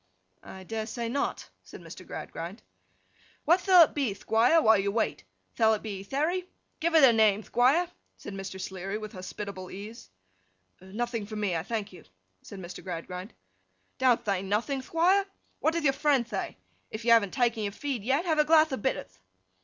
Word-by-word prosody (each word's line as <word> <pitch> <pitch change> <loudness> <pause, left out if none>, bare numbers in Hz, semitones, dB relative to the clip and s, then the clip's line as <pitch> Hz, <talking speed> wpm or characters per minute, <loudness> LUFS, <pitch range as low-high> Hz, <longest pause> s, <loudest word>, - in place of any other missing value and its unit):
'I 190 0 -11
dare 220 +3 -4
say 235 0 -4
not,' 275 +5 -2
said - - -12
Mr. - - -11
Gradgrind. - - -7 0.8
'What 345 +3 +4
thall 365 -3 +8
it - - -1
be, 265 -9 -1
Thquire, 230 +10 +3
while 220 -8 +5
you 200 +1 0
wait? 205 - -1 0.3
Thall 220 -1 +4
it 210 - -8
be 200 -3 -5
Therry? 315 - -2 0.3
Give 335 +1 0
it 315 - +7
a 250 -3 +8
name, 215 -2 +3
Thquire!' 270 - +3 0.3
said 205 - -9
Mr. 195 -1 -7
Sleary, 190 +2 -4
with 215 -1 -8
hospitable 185 0 -7
ease. 210 - -9 0.7
'Nothing 220 +3 -4
for 215 - -7
me, 205 -4 -1
I 165 - 0
thank 210 +1 -4
you,' - - -14 0.4
said 200 - -11
Mr. 180 -1 -9
Gradgrind. 180 +2 -6 0.7
'Don't 255 -2 +3
thay 195 -3 0
nothing, 220 +8 -1
Thquire. 350 +8 +2 0.4
What 320 +1 +1
doth 335 - -1
your 270 -2 +3
friend 275 -4 +2
thay? - - -4 0.3
If 220 +1 -7
you 235 - +4
haven't 215 -5 +4
took 245 -3 +2
your 210 -2 -3
feed 260 0 -4
yet, 270 - +1
have 320 -3 +1
a - - +6
glath 315 0 +5
of 265 - -3
bitterth. 95 - -3
225 Hz, 185 wpm, -28 LUFS, 200-280 Hz, 0.8 s, thall